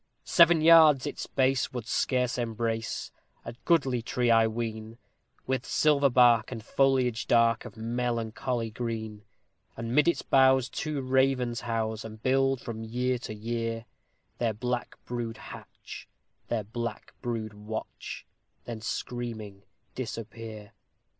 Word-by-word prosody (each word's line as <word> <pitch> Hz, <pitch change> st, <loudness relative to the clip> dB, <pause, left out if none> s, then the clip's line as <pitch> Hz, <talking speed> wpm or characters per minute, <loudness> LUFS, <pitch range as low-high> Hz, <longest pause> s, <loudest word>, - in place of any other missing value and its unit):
Seven 170 Hz, -2 st, +6 dB
yards 155 Hz, -4 st, +7 dB
its -, -, -5 dB
base 130 Hz, -1 st, +1 dB
would 120 Hz, -3 st, -4 dB
scarce 125 Hz, 0 st, 0 dB
embrace 115 Hz, -1 st, -2 dB, 0.3 s
a -, -, -6 dB
goodly 135 Hz, -8 st, +2 dB
tree 120 Hz, +1 st, 0 dB
I 115 Hz, -1 st, +5 dB
ween, 110 Hz, 0 st, -5 dB, 0.5 s
With 130 Hz, -1 st, -1 dB
silver 145 Hz, -2 st, +3 dB
bark, 120 Hz, -3 st, +5 dB
and 115 Hz, -3 st, -6 dB
foliage 130 Hz, -4 st, +1 dB
dark, 115 Hz, -1 st, +3 dB
of 105 Hz, -, -10 dB
melancholy 115 Hz, 0 st, -2 dB
green; 110 Hz, -2 st, -4 dB, 0.6 s
And 115 Hz, +1 st, -4 dB
mid 150 Hz, +4 st, +4 dB
its 170 Hz, -, +2 dB
boughs 130 Hz, -1 st, +4 dB
two 150 Hz, +2 st, -3 dB
ravens 130 Hz, -2 st, +1 dB
house, 110 Hz, -2 st, -2 dB
and 110 Hz, 0 st, -9 dB
build 135 Hz, +2 st, +2 dB
from 115 Hz, -1 st, -6 dB
year 125 Hz, +2 st, -1 dB
to 110 Hz, -, -6 dB
year, 115 Hz, +1 st, -3 dB, 0.5 s
Their 115 Hz, -2 st, +1 dB
black 125 Hz, +2 st, -3 dB
brood 120 Hz, -2 st, -4 dB
hatch -, -, -11 dB, 0.4 s
their 115 Hz, -3 st, -1 dB
black 115 Hz, +1 st, -5 dB
brood 115 Hz, -3 st, -3 dB
watch 105 Hz, +1 st, -7 dB, 0.4 s
then 115 Hz, -2 st, -6 dB
screaming 110 Hz, -4 st, -5 dB, 0.3 s
disappear. 115 Hz, -3 st, -7 dB
120 Hz, 125 wpm, -28 LUFS, 110-130 Hz, 0.6 s, yards